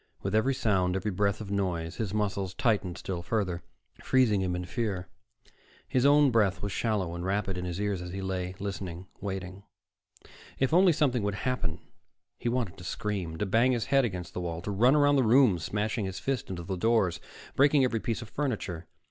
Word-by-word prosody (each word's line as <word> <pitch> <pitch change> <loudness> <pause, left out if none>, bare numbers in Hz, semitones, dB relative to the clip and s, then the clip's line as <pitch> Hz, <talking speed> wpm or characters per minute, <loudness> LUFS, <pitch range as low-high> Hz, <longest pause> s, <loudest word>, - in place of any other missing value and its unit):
With 95 - -2
every 130 +5 +2
sound, 95 -7 +1
every 105 +2 -1
breath 100 +2 0
of 100 -2 -6
noise, 90 -5 -2
his 110 -4 -2
muscles 100 -3 -1
tightened 100 -7 0
still 90 -3 -4
further, 90 -2 -1 0.4
freezing 120 -7 +3
him 90 -1 -1
in 90 0 -4
fear. 95 -3 -3 0.8
His 130 +1 +3
own 145 -1 +6
breath 105 -5 +2
was 100 - -2
shallow 100 -6 -1
and 85 0 -5
rapid 95 0 -1
in 90 0 -4
his 90 +1 -4
ears 100 -3 -1
as 90 - -6
he 95 - -5
lay, 95 -1 -3
listening, 95 -3 -5
waiting. 95 -1 -5 1.0
If 135 +3 +1
only 180 +1 +6
something 140 -6 +1
would 100 -1 -1
happen! 125 -12 -2 0.6
He 120 - -1
wanted 120 -7 -2
to - - -10
scream, 95 -6 -3
to 105 - -1
bang 115 +6 +3
his 115 -4 -1
head 135 0 +6
against 90 -7 -4
the 90 - -3
wall, 85 -1 -4
to 105 - -3
run 120 +8 +4
about 145 -1 +4
the 135 - +4
room 115 -5 +5
smashing 105 +6 -2
his 95 -1 -4
fist 130 +3 -2
into 90 -2 -5
doors, 95 -4 +2 0.4
breaking 140 0 +5
every 120 -3 +1
piece 115 +1 -2
of 110 - -12
furniture. 100 - -3
100 Hz, 195 wpm, -29 LUFS, 90-120 Hz, 1.0 s, own